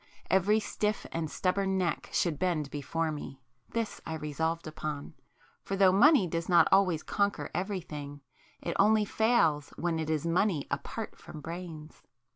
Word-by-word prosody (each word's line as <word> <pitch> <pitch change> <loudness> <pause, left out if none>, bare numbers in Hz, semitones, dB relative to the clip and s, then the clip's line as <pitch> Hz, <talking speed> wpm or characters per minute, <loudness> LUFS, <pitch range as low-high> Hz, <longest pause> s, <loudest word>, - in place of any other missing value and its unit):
Every 195 +4 +4
stiff 210 0 -2
and 165 -2 -2
stubborn 190 +2 0
neck 175 -4 -1
should 160 -5 0
bend 160 -6 0
before 155 +3 -2
me;—this 135 - -6
I 160 - -4
resolved 160 +2 -2
upon; 155 -2 -5 0.5
for 195 - -3
though 195 -1 +6
money 240 - +6
does 165 +1 -3
not 175 -1 +6
always 185 -5 +4
conquer 200 0 -1
everything, 155 -7 -4 0.4
it - - -2
only 215 +1 +5
fails 185 -11 +2
when 170 -1 -1
it 160 -1 -3
is 155 0 0
money 170 -2 +1
apart - - -4
from 155 - -10
brains. 165 -1 -8
170 Hz, 145 wpm, -30 LUFS, 155-195 Hz, 0.5 s, though